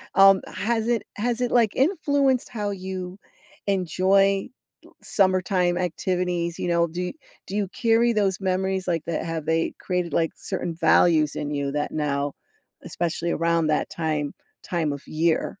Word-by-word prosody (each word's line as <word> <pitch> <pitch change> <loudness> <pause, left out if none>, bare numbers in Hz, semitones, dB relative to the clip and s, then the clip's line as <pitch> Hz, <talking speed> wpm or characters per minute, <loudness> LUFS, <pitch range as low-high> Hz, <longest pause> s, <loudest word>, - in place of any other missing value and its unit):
Um, 195 0 +7
has 225 0 -1
it 235 -3 +1
has 235 +3 -1
it, 245 - 0
like, 230 -4 +4
influenced 285 -4 +2
how 210 -3 -3
you 185 -1 -6 0.5
enjoy 195 +2 +2 0.5
summertime 185 -2 +1
activities? 175 -1 -1
You - - -2
know, 170 0 +2
do 180 +2 -4 0.3
do 195 - -5
you 205 -1 0
carry 230 +2 +2
those 200 -3 +1
memories 190 0 -1
like 165 -3 0
that? 165 -1 -2
Have 165 -2 -4
they 160 +1 0
created, 180 -4 -2
like, 165 -1 +1
certain 170 - -4
values 160 -2 +3
in 145 - -3
you 140 -1 -2
that 145 0 -2
now, 145 -2 -1 0.5
especially 170 0 -2
around 165 -1 +1
that 150 -1 0
time 155 -3 -2 0.3
time 165 -4 -1
of 140 - -7
year? 160 +1 +1
180 Hz, 150 wpm, -24 LUFS, 165-195 Hz, 0.5 s, Um